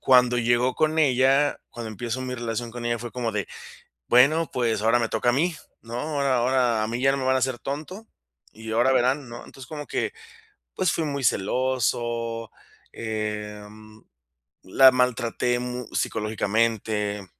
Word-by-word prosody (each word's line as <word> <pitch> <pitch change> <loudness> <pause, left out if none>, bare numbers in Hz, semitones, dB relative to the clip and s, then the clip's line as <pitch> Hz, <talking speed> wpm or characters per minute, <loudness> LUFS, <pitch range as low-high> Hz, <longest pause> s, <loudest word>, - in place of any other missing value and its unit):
cuando 125 -1 +4
llego 120 +2 +2
con 155 0 +1
ella 135 0 +3
cuando 115 -1 -7
empiezo 120 +4 -4
mi 130 0 -4
relación 120 -1 -4
con 120 +1 -7
ella 120 0 0
fue 120 +1 -7
como 120 -3 -2
de, 100 -1 -2 0.6
bueno, 155 +7 +4
pues 115 -4 0
ahora 115 +2 +3
me 115 - 0
toca 110 +2 +1
a - - +2
mí, 165 +6 +1 0.3
¿no? 115 +1 -7
Ahora 140 -3 0
ahora 120 -2 +2
a - - -2
mí 115 +2 -3
ya 135 +1 +4
no 140 - -1
me 135 - -3
van 130 0 +3
a - - +2
hacer 130 -1 -1
tonto. 155 - -6 0.5
Y 110 0 -9
ahora 120 +4 +3
verán, 130 +1 +1
¿no? 120 0 -9
Entonces, 135 - -12
como 150 -2 -7
que, - - -2 0.6
pues, 185 -3 +1
fui 165 - -1
muy 140 -2 -3
celoso, 115 0 -1 0.4
em, 105 0 -6 0.6
la 130 +8 +6
maltraté 125 -1 0
mu 125 -1 -5
psicológicamente. 105 -1 -1
120 Hz, 165 wpm, -25 LUFS, 115-130 Hz, 0.6 s, la